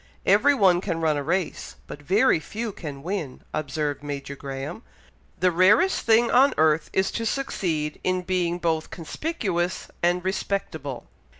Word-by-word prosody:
Every 285 - +5
one 185 -7 +4
can 170 -4 -2
run 160 -2 +2
a 145 - -1
race, 180 +5 -2
but 145 - -9
very 195 - +3
few 220 +6 -5
can 145 -7 -8
win," 175 -7 -4
observed 145 -1 -2
Major 140 -1 -5
Graham. 135 -1 -6 0.6
"The 185 0 +3
rarest 205 - +4
thing 230 +1 +5
on 270 +3 +5
earth 155 0 +3
is 190 0 +1
to 230 - -3
succeed 175 - -2
in 185 0 0
being 175 -1 0
both 165 -2 -1
conspicuous 185 - -3
and 175 +1 +1
respectable. 160 -8 -3
175 Hz, 145 wpm, -25 LUFS, 150-200 Hz, 0.6 s, Every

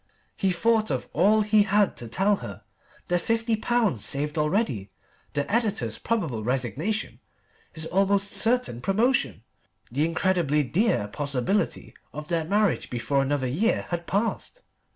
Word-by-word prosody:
He 195 -2 +1
thought 220 +4 +2
of 130 -3 -2
all 210 +6 +4
he 210 0 +4
had 205 0 +2
to 120 - -5
tell 195 - +2
her. - - -9 0.4
The 175 0 +1
fifty 230 +3 0
pounds 220 - 0
saved 150 +2 -1
already. 150 - 0 0.4
The 145 -1 0
Editor's 225 -3 0
probable 160 - -2
resignation, 135 - -2 0.5
his 160 -1 -3
own 180 +4 0
almost 200 0 +1
certain 235 - +1
promotion, 195 - +1 0.5
the 145 +5 +1
incredibly 165 -3 +1
dear 160 - +1
possibility 140 - -1 0.2
of 150 +1 -7
their 165 -2 0
marriage 205 +2 +1
before 125 +3 0
another 135 0 0
year 170 - 0
had 170 -1 -4
passed. 230 - -2
175 Hz, 140 wpm, -26 LUFS, 140-215 Hz, 0.5 s, all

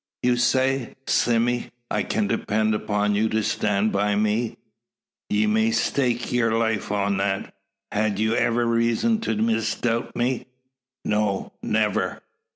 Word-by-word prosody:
"You 125 0 +3
say, 130 +1 +1
Sime, 120 +1 +2 0.3
I - - +1
can 210 +1 0
depend 110 - 0
upon 105 -1 0
you 110 +2 +1
to 110 0 0
stand 105 +1 +1
by 100 +1 +1
me?" 110 +2 0 0.7
"Ye 105 +1 +2
may 110 +1 +2
stake 120 +1 0
yur 115 -2 +2
life 110 -3 -1
on 100 -1 0
that. 95 0 -2 0.4
Had 105 -1 0
you 110 +2 +1
iver 120 0 +2
reezun 115 - +1
to 110 - -1
misdoubt 115 +2 0
me?" 125 +1 -1 0.6
"No 105 -2 0
never." - - 0
110 Hz, 135 wpm, -24 LUFS, 105-120 Hz, 0.7 s, You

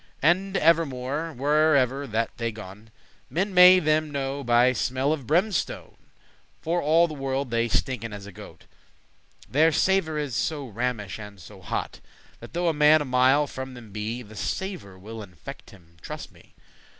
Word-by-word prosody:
*cease - - -31
And 190 +4 +2
evermore, 155 -1 +1
wherever 140 -1 +2
that 115 0 -2
they 115 -1 -2
gon, 105 0 -11 0.4
Men 195 +4 -1
may 180 0 +9
them 155 -2 +1
knowe 140 -1 -3
by 120 +1 +4
smell 130 +4 0
of 140 -7 -6
brimstone; 185 +5 -1 0.6
For 170 +2 -1
all 165 +3 +4
the 155 - -7
world 135 -2 -3
they 115 0 +1
stinken 115 0 -2
as 100 -1 -8
a 100 - -10
goat; - - -13 0.8
Their 155 +4 +3
savour 165 -1 +1
is 145 -5 -3
so 145 +5 -2
rammish 115 -3 -3
and 105 -2 -10
so 95 +3 -13
hot, 90 - -4 0.4
That - - -12
though 175 +1 0
a 165 - +2
man 150 +1 +5
a - - -8
mile 130 +3 +3
from 130 -2 -7
them 115 -4 -12
be, 110 +4 -4
The 110 0 -14
savour 170 - -5
will 110 +4 -9
infect 90 -5 -11
him, 85 -4 -19
truste - - -8
me. - - -22
135 Hz, 170 wpm, -25 LUFS, 115-155 Hz, 0.8 s, may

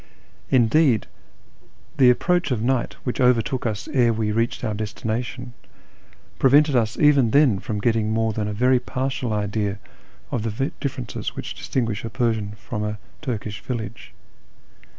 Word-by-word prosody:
Indeed 125 0 +4 0.9
the 130 -2 +7
approach 175 +8 +2
of 125 -4 0
night, 120 +2 0
which 125 +1 -2
overtook 125 +1 +2
us 105 -2 -4
ere 125 -6 +3
we 110 -1 -1
reached 115 +2 -1
our 110 - -1
destination, 115 +4 -4 0.9
prevented 145 +2 +5
us 110 -2 +1
even 140 -5 +5
then 130 -6 +4
from 105 +2 -4
getting 110 0 +1
more 110 0 +1
than 105 0 -2
a - - -2
very 125 +4 +3
partial 130 -1 -3
idea 105 -1 -1 0.5
of 120 - -1 0.2
the 135 - 0
differences 130 -3 -4
which - - -5
distinguish 115 -6 -2
a 115 - -4
Persian 110 -3 -1
from 105 +1 -5
a 105 0 -3 0.2
Turkish 110 -7 -4
village. 115 -6 -6
115 Hz, 145 wpm, -23 LUFS, 110-130 Hz, 0.9 s, the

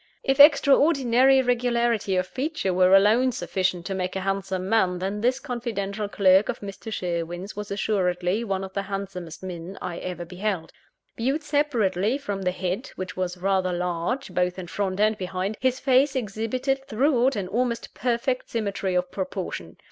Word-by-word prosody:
If 270 +1 +1
extraordinary 275 -3 +6
regularity 235 -4 +1
of 185 0 +1
feature 265 - -2
were 185 +1 +5
alone 220 +6 +5
sufficient 185 -6 -2
to 195 - -3
make 185 -1 -3
a 190 - -2
handsome 190 -1 -2
man, 190 -4 +2
then 195 +3 -3
this 255 +3 +2
confidential 215 -5 -4
clerk 190 0 +4
of 245 - -2
Mr. 200 +2 -7
Sherwin's 175 0 -3
was 210 0 -6
assuredly 190 0 0
one 195 -3 -2
of 190 0 -8
the 200 - -1
handsomest 195 -4 -6
men 180 +1 -7
I 175 -2 -5
ever 180 -1 -5
beheld. 180 -1 -3 0.5
Viewed 270 +7 0
separately 250 -7 +1
from 205 -9 -4
the 180 - +1
head 185 +6 -3
(which 185 0 -6
was 185 -1 -3
rather 190 0 +1
large, 180 +8 -2
both 180 0 0
in 185 - -5
front 190 +2 -3
and 215 +1 +3
behind) 185 +2 -3
his 260 0 +1
face 270 +1 +3
exhibited, 255 +4 -1
throughout, 260 +1 +2
an 200 -3 -3
almost 235 +3 -2
perfect 250 +1 -1
symmetry 200 -4 -2
of 180 0 0
proportion. 185 - -5
200 Hz, 165 wpm, -25 LUFS, 185-245 Hz, 0.5 s, extraordinary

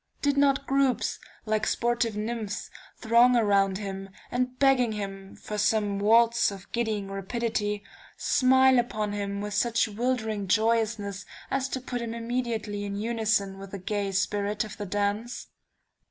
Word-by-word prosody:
Did 285 -1 +2
not 280 -1 +3
groups, 265 -5 +1 0.3
like 215 0 0
sportive 235 -2 0
nymphs, 215 -1 -4 0.3
throng 235 +2 +5
around 200 -4 +3
him, 195 -1 -6 0.2
and 250 +1 -1
begging 255 -4 +3
him 195 -2 -6
for 210 0 -5
some 205 -1 +1
waltz 230 +3 +4
of 195 -2 -10
giddying 215 -4 -2
rapidity, 205 0 -2 0.3
smile 260 -1 +4
upon 215 -3 -2
him 200 -1 -3
with 210 0 -4
such 230 +2 +2
wildering 220 -2 -2
joyousness, 215 -2 +1 0.2
as 270 0 0
to 260 - -3
put 245 -1 -4
him 230 -1 -4
immediately 230 -3 -2
in 200 0 -4
unison 215 -3 0
with 195 0 -9
the 200 - -6
gay 200 +1 -2
spirit 205 +2 0
of 210 -1 -8
the 205 - -5
dance? 205 +4 -2
215 Hz, 145 wpm, -27 LUFS, 200-240 Hz, 0.3 s, throng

